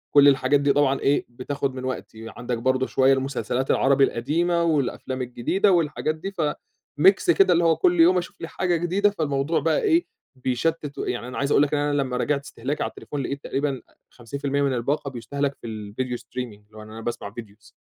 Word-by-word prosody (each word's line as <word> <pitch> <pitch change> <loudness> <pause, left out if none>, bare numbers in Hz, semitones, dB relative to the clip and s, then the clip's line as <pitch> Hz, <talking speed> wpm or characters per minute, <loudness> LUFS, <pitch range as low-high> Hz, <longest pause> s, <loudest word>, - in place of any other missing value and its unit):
كُلّ 145 0 +8
الحاجات 140 0 +4
دي 140 0 +2
طبعًا 140 -1 +2
إيه 140 +1 +1
بتاخد 135 +2 -3
من 130 - -6
وقتي، 115 -3 -6
عندك 120 0 -3
برضه 130 +2 +1
شوية 135 +1 +4
المسلسلات 135 -1 -1
العربي 135 0 +3
القديمة، 170 +8 +1
والأفلام 140 -4 -1
الجديدة، 125 - +1
والحاجات 155 -2 +1
دي، 190 +5 -6
فmix 170 - +1
كده، 390 - +5
اللي 170 - +2
هو 165 -1 +4
كل 175 +2 +2
يوم 175 +3 +6
أشوف 180 - -5
لي 165 - -4
حاجة 180 +1 -1
جديدة، 180 +5 +2
فالموضوع 155 -4 -1
بقى 160 +2 +1
إيه 345 -5 +3 0.3
بيشتِّت، 140 +4 -2
و - - -3
يعني 120 0 -3
أنا 125 - -7
عايز 140 +1 -1
أقول 140 - +5
لك 145 - -1
إن 150 - +2
أنا 145 -1 +1
لمّا 130 -2 -2
راجعت 140 +2 0
استهلاكي 140 +1 -4
على - - -2
التليفون، 145 - -6
لقيت 140 +2 -4
تقريبًا 140 -2 -2 0.3
50% 140 +4 -3
من 140 -2 +1
الباقة 140 +4 -1
بيُستهلك 140 +4 -3
في - - -7
الفيديو 110 +3 -4
streaming، 120 -2 -7
اللي 110 - -17
هو - - -9
إن 105 - -12
أنا 110 +1 -8
باسمع 115 -3 -5
videos 105 -1 -13
140 Hz, 200 wpm, -24 LUFS, 125-155 Hz, 0.3 s, كُلّ